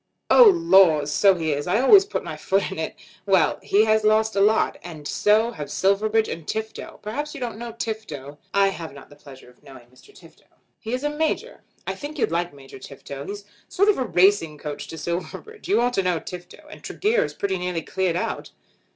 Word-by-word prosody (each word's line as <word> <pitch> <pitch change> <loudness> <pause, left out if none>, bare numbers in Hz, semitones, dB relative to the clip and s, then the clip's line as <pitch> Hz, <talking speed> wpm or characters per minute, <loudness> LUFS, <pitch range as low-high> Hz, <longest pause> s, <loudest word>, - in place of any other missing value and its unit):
"Oh - - +9
laws; 190 - +4
so 195 -2 +5
he 160 -3 -2
is. 145 +3 -4
I 195 +5 +2
always 385 - +7
put - - -4
my - - -6
foot 195 0 -1
in 190 - -6
it. 160 - -4 0.3
Well; 185 -6 +3
he 210 +2 +3
has 215 0 +2
lost 215 0 +2
a 195 - +2
lot. 215 +2 +2
And 155 -4 -8
so 220 +3 +2
have 150 -10 -7
Silverbridge 215 +3 +1
and 165 -2 -7
Tifto. 220 0 -5
Perhaps 290 +9 -4
you - - -7
don't 235 -4 -5
know 235 0 -6
Tifto." 160 - -6
"I 200 0 +3
have 165 -6 -7
not 140 - -14
the - - -14
pleasure 140 -3 -15
of 125 - -28
knowing 130 -4 -15
Mr. 130 - -20
Tifto." - - -19 0.3
"He 225 - -6
is 255 +2 -2
a 295 - +1
major. 315 +1 -2 0.2
I - - -2
think 295 +2 -8
you'd 250 - 0
like 175 +1 -1
Major 135 -2 -13
Tifto. 140 +1 -9
He's 205 +1 -6
a - - -32 0.2
sort 400 +3 +2
of 255 - 0
racing 180 -4 +3
coach 150 0 -6
to 160 - -8
Silverbridge. 180 - -6
You 395 - +3
ought 245 +1 +1
to 195 - +1
know 180 -3 0
Tifto. 175 +1 -10
And - - -12
Tregear 445 +3 0
is - - -6
pretty 190 -2 -2
nearly 180 -2 -3
cleared 185 -3 -1
out." 180 - -3
195 Hz, 215 wpm, -23 LUFS, 160-225 Hz, 0.3 s, Oh